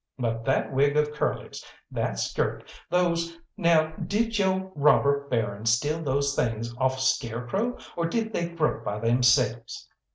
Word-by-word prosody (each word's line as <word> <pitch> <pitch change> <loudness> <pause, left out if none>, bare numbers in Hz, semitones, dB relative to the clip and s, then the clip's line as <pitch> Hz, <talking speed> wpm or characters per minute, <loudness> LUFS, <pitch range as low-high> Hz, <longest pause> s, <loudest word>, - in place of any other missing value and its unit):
But 115 -2 -2
that 135 +1 0
wig 140 +2 +3
of 150 0 +1
Curly's, 150 - -3 0.3
that - - -2
skirt, - - -1 0.3
those 170 -2 0 0.2
now 165 -4 +3
did 225 +2 0
yo' 190 -1 0
robber 140 -2 +3
baron 110 -4 -2
steal 145 +8 +1
those 140 -1 0
things 115 0 -1
off 130 0 +1
a - - -4
scarecrow, 130 - -1 0.2
or 170 -1 0
did 220 +4 -2
they 170 0 -1
grow 165 -3 -1
by 100 - -3
themselves?" 120 0 +2
140 Hz, 150 wpm, -26 LUFS, 120-170 Hz, 0.3 s, wig